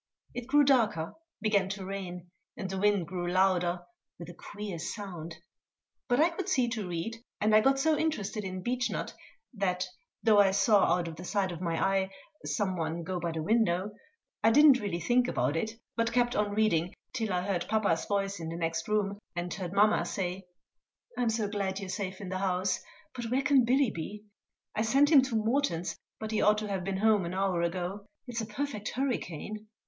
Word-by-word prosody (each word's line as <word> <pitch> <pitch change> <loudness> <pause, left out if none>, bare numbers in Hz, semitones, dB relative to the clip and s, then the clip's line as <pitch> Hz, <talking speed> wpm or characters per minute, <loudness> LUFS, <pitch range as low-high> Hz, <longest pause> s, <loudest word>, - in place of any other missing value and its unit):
It 245 -1 -6
grew 290 +2 +5
darker, 230 - +2 0.3
began 200 -3 +2
to 195 -1 -5
rain, 180 -2 -6 0.3
and 195 - -3
the 190 0 -3
wind 205 -3 +3
grew 175 +1 -3
louder, 180 -2 +2 0.4
with 170 -1 -9
a - - -13
queer 205 0 -7
sound; 170 -4 -6 0.7
but 245 +2 +2
I 330 +3 +5
could 375 +3 -4
see 255 -9 +3
to 220 -5 -3
read, 175 +7 -3 0.2
and 215 0 +2
I 215 - +7
got 270 +3 +3
so 310 +3 +3
interested 220 -9 -1
in 185 -1 -5
Beechnut 250 +1 -1 0.4
that, 185 -4 0 0.4
though 215 -2 +6
I 200 -1 +6
saw 200 +1 +4
out 175 -1 -2
of 160 -1 -7
the 175 - -8
side 190 0 0
of 175 0 -7
my 170 -2 -1
eye 195 0 +1 0.3
some 190 -4 -1
one 165 +1 -2
go 180 +2 -3
by 170 0 -2
the 160 -1 -3
window, 205 -1 +2 0.5
I 225 - +6
did 295 +7 +6
not 275 -4 +8
really 195 -6 -2
think 245 +9 +2
about 150 - 0
it, 220 +7 -1 0.2
but 230 0 +1
kept 240 0 +2
on 205 -1 0
reading 180 -5 +2 0.2
till 225 -5 -1
I 180 -1 0
heard 190 -2 -1
papa's 205 -7 +1
voice 200 -1 -1
in 165 -1 -5
the 165 - -5
next 165 -1 -2
room, 205 -1 0 0.2
and 175 0 -3
heard 180 -3 -5
mamma 205 +2 +4
say: 185 0 -3 0.7
"I'm 245 -2 +1
so 220 -2 0
glad 200 -2 -2
you're 195 -2 -6
safe 190 -1 -4
in 195 -3 -6
the 185 0 -2
house; 185 0 0 0.3
but 245 -2 -5
where 255 +4 0
can 275 -4 +5
Billy 260 0 +3
be? 200 +6 -6 0.5
I - - -1
sent 275 +7 +4
him 285 -4 +9
to 260 -3 -2
Morton's, 220 - 0 0.2
but 220 0 -4
he 220 - +1
ought 210 0 +5
to 215 0 -3
have 190 -2 -2
been 195 +1 -2
home 210 -1 +3
an 170 +2 -4
hour 190 -3 +1
ago. 180 +4 -3 0.2
It's 240 -2 -3
a 220 - -4
perfect 220 -2 -3
hurricane!" 215 - -3
200 Hz, 205 wpm, -30 LUFS, 180-225 Hz, 0.7 s, him